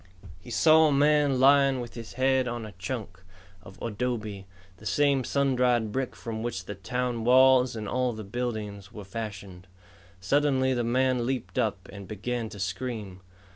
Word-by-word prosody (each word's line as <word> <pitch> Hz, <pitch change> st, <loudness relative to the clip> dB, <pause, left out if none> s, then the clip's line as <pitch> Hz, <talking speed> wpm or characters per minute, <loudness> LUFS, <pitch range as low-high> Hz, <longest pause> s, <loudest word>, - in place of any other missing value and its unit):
He 95 Hz, -, -13 dB
saw 160 Hz, +5 st, +5 dB
a -, -, +1 dB
man 145 Hz, -1 st, +3 dB
lying 135 Hz, 0 st, +5 dB
with 120 Hz, -1 st, -7 dB
his 115 Hz, -2 st, -9 dB
head 130 Hz, 0 st, +2 dB
on 120 Hz, -2 st, -4 dB
a 105 Hz, -, -9 dB
chunk 95 Hz, -3 st, -5 dB, 0.4 s
of 95 Hz, 0 st, -14 dB
adobe, 110 Hz, -3 st, -3 dB, 0.3 s
the 105 Hz, -, -15 dB
same 140 Hz, +5 st, +2 dB
sun 140 Hz, +1 st, +1 dB
dried 120 Hz, -3 st, +2 dB
brick 130 Hz, +2 st, -3 dB
from 110 Hz, -1 st, -6 dB
which 110 Hz, -6 st, -4 dB
the 105 Hz, -, -5 dB
town 120 Hz, +3 st, -3 dB
walls 130 Hz, 0 st, +5 dB
and 110 Hz, -2 st, -5 dB
all 125 Hz, +1 st, 0 dB
the 110 Hz, -1 st, -7 dB
buildings 105 Hz, -3 st, -5 dB
were 105 Hz, -3 st, -9 dB
fashioned. 95 Hz, -3 st, -7 dB, 0.5 s
Suddenly 130 Hz, +5 st, +2 dB
the 120 Hz, -1 st, -1 dB
man 125 Hz, 0 st, +1 dB
leaped 130 Hz, 0 st, -3 dB
up 105 Hz, -6 st, -1 dB
and 100 Hz, -2 st, -9 dB
began 115 Hz, +2 st, -4 dB
to 100 Hz, -, -10 dB
scream. 95 Hz, 0 st, -4 dB
120 Hz, 170 wpm, -27 LUFS, 105-130 Hz, 0.5 s, saw